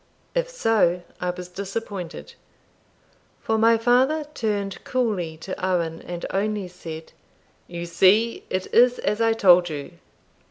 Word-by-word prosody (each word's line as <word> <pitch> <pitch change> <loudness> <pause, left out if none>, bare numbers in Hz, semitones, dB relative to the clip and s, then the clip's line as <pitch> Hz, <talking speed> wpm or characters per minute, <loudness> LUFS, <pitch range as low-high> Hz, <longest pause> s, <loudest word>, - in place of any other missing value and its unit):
If - - 0
so, 215 - +2 0.2
I 180 - -1
was 180 0 -5
disappointed; 195 -1 -6 1.1
for 220 0 0
my 230 +1 +5
father 255 +7 +3
turned 205 -5 -2
coolly 205 -11 -1
to 185 +3 -7
Owen, 170 -3 0
and 175 -1 -6
only 205 0 -1
said, 165 -3 -9 0.6
"You 170 0 -6
see 195 +7 +3
it 185 0 -1
is 245 +1 +5
as 210 +3 -1
I 225 0 +4
told 180 -5 +5
you. 145 -2 -7
195 Hz, 130 wpm, -24 LUFS, 175-225 Hz, 1.1 s, my